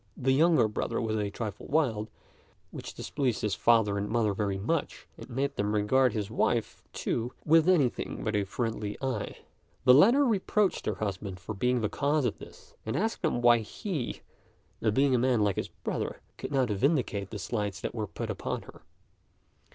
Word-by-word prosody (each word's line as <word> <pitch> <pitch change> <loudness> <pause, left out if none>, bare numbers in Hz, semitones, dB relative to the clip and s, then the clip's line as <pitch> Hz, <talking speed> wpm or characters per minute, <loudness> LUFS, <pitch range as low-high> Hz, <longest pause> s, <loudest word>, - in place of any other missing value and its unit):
The 130 +1 +1
younger 160 -3 +4
brother 110 +2 -2
was 110 -1 -1
a 105 -2 -1
trifle 105 0 -6
wild, 115 -8 +1 0.6
which - - -8
displeased 130 -6 -2
his 105 -2 0
father 110 -4 +3
and 100 - -3
mother 110 -3 +1
very 100 -1 -1
much, 140 +11 -2
and - - -11
made 135 +3 -1
them 105 +1 0
regard 125 +5 +3
his 105 -1 -3
wife, 115 0 0
too, 120 +2 -2
with 160 +2 +5
anything 145 -10 +1
but 110 -1 -1
a 105 - +2
friendly 105 0 -3
eye. 130 -6 -3 0.5
The 125 - +7
latter 235 - +6
reproached 210 -3 +1
her 110 - 0
husband 95 -2 -4
for 90 +4 -6
being 125 +4 +1
the 105 - +1
cause 145 +4 0
of 120 - -2
this, - - -14
and 110 - -3
asked 220 0 -1
him 135 -7 0
why 120 -1 +6
he, 135 - -4 0.7
being 135 +4 +3
a 125 - +3
man 125 -2 +2
like 100 -3 +1
his - - -2
brother, - - -4 0.2
could - - -5
not 130 -4 +2
vindicate 105 - 0
the 110 - -6
slights 105 -1 -3
that - - -3
were - - -3
put - - -4
upon - - -4
her. - - -14
115 Hz, 180 wpm, -29 LUFS, 105-140 Hz, 0.7 s, The